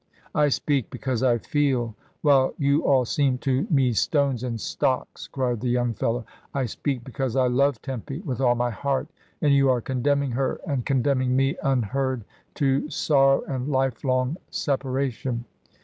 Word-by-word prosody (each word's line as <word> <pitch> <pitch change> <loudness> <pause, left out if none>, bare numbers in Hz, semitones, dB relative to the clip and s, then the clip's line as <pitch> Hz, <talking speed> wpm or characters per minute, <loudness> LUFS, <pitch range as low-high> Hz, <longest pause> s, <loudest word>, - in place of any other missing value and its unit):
"I 150 -1 +3
speak 140 -2 0
because 130 -4 -3
I 125 -2 +3
feel, 130 -3 0 0.3
while 140 -3 +4
you 140 +1 +2
all 130 -3 +4
seem 135 +1 +1
to 135 +6 +1
me 135 -7 +3
stones 140 0 +1
and 120 -3 -3
stocks," 130 +4 -2
cried 125 -4 -2
the 125 - -1
young 120 -1 +1
fellow. 115 +1 -1 0.3
"I 135 -2 +1
speak 125 +2 -3
because 130 -1 -3
I 130 -1 +3
love 130 0 +2
Tempy 135 0 -5
with 135 -7 -4
all 120 -2 +4
my 120 0 0
heart, 140 +5 -2 0.3
and 145 -2 +5
you 135 -1 +4
are 125 -1 +3
condemning 135 +3 0
her 130 +3 -1
and 140 -7 -2
condemning 130 -1 +1
me 135 +1 +2
un 135 -4 +1
heard 130 +2 -2 0.3
to 140 +1 +1
sorrow 135 -3 +3
and 130 -1 -4
life 135 -4 0
long 130 +3 +1
separation." 130 -3 -2
130 Hz, 165 wpm, -25 LUFS, 125-140 Hz, 0.3 s, and